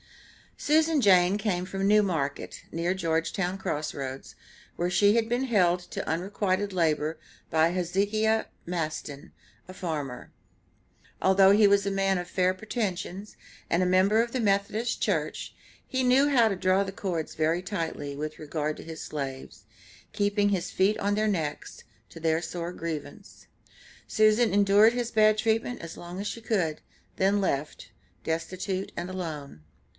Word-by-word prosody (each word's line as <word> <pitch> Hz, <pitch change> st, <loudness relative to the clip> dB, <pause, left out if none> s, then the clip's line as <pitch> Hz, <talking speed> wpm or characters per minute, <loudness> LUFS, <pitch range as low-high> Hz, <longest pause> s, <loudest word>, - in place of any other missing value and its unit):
Susan 315 Hz, 0 st, +2 dB
Jane 185 Hz, -2 st, +5 dB
came 185 Hz, -4 st, -1 dB
from 195 Hz, +1 st, -2 dB
New 210 Hz, +1 st, +5 dB
Market, 155 Hz, -7 st, -3 dB
near 170 Hz, +2 st, 0 dB
Georgetown 175 Hz, +2 st, -1 dB
Cross 155 Hz, -5 st, -3 dB
Roads, 135 Hz, -1 st, -6 dB, 0.4 s
where 175 Hz, +1 st, -1 dB
she 205 Hz, +3 st, +4 dB
had 230 Hz, -1 st, +2 dB
been 245 Hz, +3 st, 0 dB
held 180 Hz, -7 st, +3 dB
to -, -, -4 dB
unrequited 190 Hz, +3 st, -1 dB
labor 160 Hz, -3 st, 0 dB, 0.3 s
by 160 Hz, +1 st, +3 dB
Hezekiah 205 Hz, +5 st, 0 dB, 0.2 s
Masten, 155 Hz, -4 st, -4 dB, 0.4 s
a 185 Hz, -, -9 dB
farmer. 150 Hz, -9 st, -5 dB, 0.9 s
Although 190 Hz, 0 st, +5 dB
he 205 Hz, +1 st, +6 dB
was 200 Hz, 0 st, +3 dB
a 200 Hz, -, 0 dB
man 195 Hz, -1 st, +1 dB
of 175 Hz, -, -5 dB
fair 185 Hz, 0 st, +1 dB
pretensions, 200 Hz, -1 st, -4 dB, 0.4 s
and 170 Hz, -, +3 dB
a -, -, +2 dB
member 190 Hz, +4 st, +4 dB
of 235 Hz, 0 st, -3 dB
the 260 Hz, -, 0 dB
Methodist 210 Hz, +2 st, 0 dB
Church, -, -, -1 dB, 0.3 s
he 260 Hz, 0 st, -1 dB
knew 265 Hz, +3 st, +4 dB
how 245 Hz, -5 st, +5 dB
to 205 Hz, -, 0 dB
draw 185 Hz, +1 st, +2 dB
the 195 Hz, -, -5 dB
cords 180 Hz, -5 st, -3 dB
very 160 Hz, +3 st, 0 dB
tightly, 165 Hz, -7 st, -4 dB
with 155 Hz, +1 st, -5 dB
regard 155 Hz, 0 st, -3 dB
to -, -, -9 dB
his 160 Hz, -1 st, -8 dB
slaves, 135 Hz, -3 st, -6 dB, 0.5 s
keeping 205 Hz, 0 st, +1 dB
his 190 Hz, -3 st, -1 dB
feet 200 Hz, +3 st, +2 dB
on 205 Hz, +1 st, 0 dB
their 215 Hz, +1 st, +1 dB
necks, 160 Hz, -8 st, -3 dB, 0.3 s
to -, -, -11 dB
their 160 Hz, 0 st, +1 dB
sore 170 Hz, +1 st, -5 dB
grievance. 165 Hz, -4 st, -7 dB, 0.6 s
Susan 215 Hz, 0 st, +3 dB
endured 205 Hz, +3 st, +5 dB
his 240 Hz, -1 st, -2 dB
bad 215 Hz, -1 st, +4 dB
treatment 225 Hz, +2 st, 0 dB
as 165 Hz, -1 st, -8 dB
long 175 Hz, +2 st, -8 dB
as 205 Hz, -, -3 dB
she 230 Hz, -, -5 dB
could, 180 Hz, -9 st, -1 dB, 0.4 s
then 200 Hz, +2 st, +2 dB
left, 150 Hz, -5 st, -3 dB, 0.3 s
destitute 185 Hz, +4 st, -3 dB
and 175 Hz, +1 st, -4 dB
alone. 155 Hz, -, -6 dB
185 Hz, 155 wpm, -27 LUFS, 165-205 Hz, 0.9 s, he